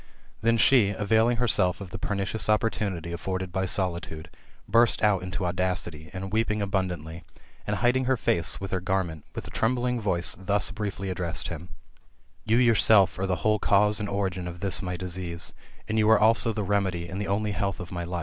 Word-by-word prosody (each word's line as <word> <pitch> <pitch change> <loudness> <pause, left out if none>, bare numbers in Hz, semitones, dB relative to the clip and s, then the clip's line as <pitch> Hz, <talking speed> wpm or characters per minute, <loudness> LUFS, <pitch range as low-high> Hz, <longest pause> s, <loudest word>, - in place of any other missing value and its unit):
Then 115 +1 +3
she, 115 -2 +5
avail 110 +3 +2
ing 120 0 +1
herself 105 -6 +2
of 95 -3 -9
the - - -6
pernicious 100 +2 -2
opportunity 100 -5 0
afforded 95 +1 -4
by 95 +1 -1
solitude, 85 -3 -2 0.4
burst 115 -1 +3
out 105 -3 +3
into 90 0 -3
audacity, 85 -3 -2
and 95 +1 -6
weeping 110 -1 +1
abundantly, 90 -5 -3 0.4
and 105 - 0
hiding 125 +4 +2
her 130 0 +2
face 85 -5 +1
with 95 -1 -6
her 95 - 0
garment, 90 -4 -2
with - - -5
a - - -9
trembling 125 +1 0
voice 90 -4 0
thus 100 +1 0
briefly 100 -3 -4
ad 90 - -5
dressed 85 -3 -1
him: 85 - -7 0.4
'' - - -37
You 115 - +5
yourself 110 -6 +4
are 95 - -1
the 90 0 -2
whole 105 0 +3
cause 105 +1 +3
and 105 -1 -3
origin 95 -3 -2
of 90 0 -7
this 95 -2 +1
my 90 -2 -4
disease, 85 -2 -4 0.3
and 110 0 0
you 105 0 +3
are 110 - +6
also 115 +2 +4
the 105 -1 -3
remedy, 95 -3 -1
and 95 +4 -5
the 100 - -3
only 105 +2 0
health 100 -1 -2
of 90 - -8
my 85 -1 -4
life. 85 +1 -4
95 Hz, 200 wpm, -26 LUFS, 90-105 Hz, 0.4 s, are